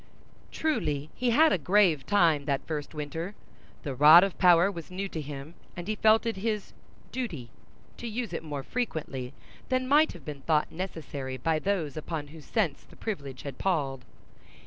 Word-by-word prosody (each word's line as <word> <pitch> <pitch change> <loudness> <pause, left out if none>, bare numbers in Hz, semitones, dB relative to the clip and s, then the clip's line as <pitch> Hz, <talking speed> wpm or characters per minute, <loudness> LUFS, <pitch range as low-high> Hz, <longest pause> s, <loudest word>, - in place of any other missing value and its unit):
Truly 155 - -1
he 250 0 0
had 310 +7 +5
a - - +1
grave 180 -4 +3
time 165 -8 +3
that 140 -2 -1
first 150 -1 -5
winter. 160 +6 -5 0.5
The 140 - -3
rod 150 +6 +9
of 195 -2 -1
power 180 +1 +6
was 170 -4 -8
new 190 +2 -3
to 160 - -4
him, 145 +1 -8 0.2
and 175 +1 -6
he 215 - 0
felt 220 +2 +4
it 230 -3 -1
his 210 0 -2 0.4
"duty" 165 - -5 0.5
to 240 - -6
use 225 -4 -4
it - - -3
more 145 -4 -5
frequently 145 - -3 0.4
than 255 0 +1
might 300 +3 +4
have 170 -6 -13
been 145 -2 -7
thought 150 +1 +1
necessary 150 -7 -5
by 155 +5 0
those 165 -6 -1
upon 155 -2 -4
whose 155 -1 -12
sense 195 -11 0
the - - -19
privilege 140 - -5
had 140 -3 -7
palled. 140 -9 -1
165 Hz, 175 wpm, -28 LUFS, 145-205 Hz, 0.5 s, rod